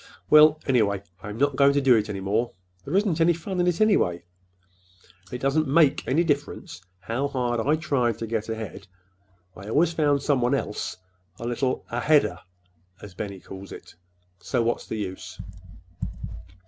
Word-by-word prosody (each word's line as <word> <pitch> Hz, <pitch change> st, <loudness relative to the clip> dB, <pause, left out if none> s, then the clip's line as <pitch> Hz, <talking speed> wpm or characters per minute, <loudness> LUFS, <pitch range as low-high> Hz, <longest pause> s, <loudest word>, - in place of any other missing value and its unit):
"Well, 155 Hz, 0 st, +7 dB
anyhow, 110 Hz, -7 st, +2 dB, 0.3 s
I'm 105 Hz, 0 st, -7 dB
not 140 Hz, +1 st, +2 dB
going 140 Hz, 0 st, +5 dB
to 140 Hz, -, +3 dB
do 135 Hz, -3 st, +5 dB
it 105 Hz, -1 st, 0 dB
any 100 Hz, -2 st, -4 dB
more. 110 Hz, +5 st, 0 dB, 0.3 s
There 150 Hz, -, -3 dB
isn't 195 Hz, -5 st, +2 dB
any 170 Hz, +1 st, +5 dB
fun 180 Hz, +3 st, -5 dB
in 175 Hz, -, +2 dB
it, 175 Hz, -1 st, +1 dB
anyway. 90 Hz, -, +2 dB, 1.1 s
It 125 Hz, -, -3 dB
doesn't 140 Hz, +3 st, +1 dB
make 150 Hz, 0 st, +3 dB
any 155 Hz, +6 st, +3 dB
difference 145 Hz, -, -3 dB, 0.2 s
how 120 Hz, +7 st, -2 dB
hard 125 Hz, -3 st, -1 dB
I 145 Hz, +7 st, +2 dB
tried 135 Hz, -8 st, 0 dB
to 115 Hz, -, -4 dB
get 115 Hz, -1 st, -3 dB
ahead, 110 Hz, -2 st, -6 dB, 0.7 s
I 100 Hz, +2 st, -9 dB
always 160 Hz, +8 st, +2 dB
found 145 Hz, -3 st, +2 dB
somebody 135 Hz, -2 st, +2 dB
else 105 Hz, -, -4 dB, 0.4 s
a 115 Hz, -, -7 dB
little 125 Hz, +2 st, -1 dB
'aheader' 145 Hz, +5 st, +2 dB, 0.6 s
as 100 Hz, -3 st, -11 dB
Benny 100 Hz, +1 st, -6 dB
calls 95 Hz, +1 st, -10 dB
it. -, -, -11 dB, 0.5 s
So 120 Hz, +6 st, -1 dB
what's 115 Hz, +1 st, -1 dB
the -, -, -4 dB
use?" 95 Hz, -3 st, -6 dB
130 Hz, 160 wpm, -25 LUFS, 110-150 Hz, 1.1 s, Well